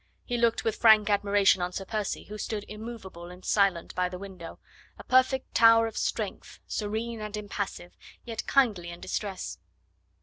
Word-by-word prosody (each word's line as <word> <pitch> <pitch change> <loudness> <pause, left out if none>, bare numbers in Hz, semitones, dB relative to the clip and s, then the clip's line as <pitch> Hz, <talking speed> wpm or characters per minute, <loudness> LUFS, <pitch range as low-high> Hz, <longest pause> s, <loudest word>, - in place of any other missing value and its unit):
He 245 - -2
looked 235 -1 +2
with 225 -1 -1
frank 220 -2 +6
admiration 200 -2 +3
on 180 +1 -2
Sir 195 - -4
Percy, 210 0 -3
who 210 +1 -9
stood 210 -1 -3
immovable 210 -6 -8
and 180 +1 -12
silent 195 -5 +2
by 180 0 0
the 180 - -6
window 185 -3 -9 0.4
a - - -10
perfect 260 +1 +2
tower 230 0 +7
of 225 - -5
strength, - - -3
serene 220 +2 -3
and 210 0 -5
impassive, 200 -3 -5 0.3
yet 230 -2 -5
kindly 215 -11 +2
in 170 0 -8
distress. 195 -1 -4
210 Hz, 165 wpm, -28 LUFS, 190-225 Hz, 0.4 s, tower